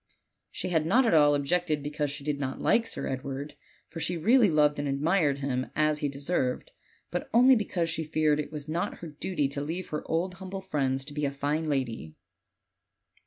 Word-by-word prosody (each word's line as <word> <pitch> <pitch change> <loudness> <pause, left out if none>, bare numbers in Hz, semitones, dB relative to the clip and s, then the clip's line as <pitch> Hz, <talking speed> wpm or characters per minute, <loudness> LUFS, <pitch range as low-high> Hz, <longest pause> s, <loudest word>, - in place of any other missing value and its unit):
She - - -4
had 160 -3 +1
not 245 +8 +4
at 225 - +3
all 145 -2 +6
ob 140 -1 -1
jected 165 -2 0
because 145 0 -2
she 145 0 -6
did 145 -1 -2
not 135 -2 -3
like 230 0 +2
Sir - - -4
Edward, 135 +2 -4 0.3
for 165 - -8
she 175 +2 -1
really 225 +5 +5
loved 150 -2 +3
and 145 - -1
admired 145 +1 +2
him 130 -2 -2
as 155 0 +2
he 145 - -1
deserved, 140 -2 -2 0.4
but 175 - -3
only 255 +2 +7
because 190 -6 -1
she 165 - -1
feared 155 -1 +1
it 150 - -4
was 150 -1 -6
not 165 +3 -2
her 170 - -6
duty 150 0 -2
to 140 0 -4
leave 165 +5 -4
her 150 - -3
old 175 +3 0
humble 190 +1 -7
friends 135 -7 -1
to 145 - -9
be 150 0 -3
a 140 - 0
fine 145 +3 -1
lady. 115 - -2
150 Hz, 205 wpm, -28 LUFS, 140-175 Hz, 0.4 s, only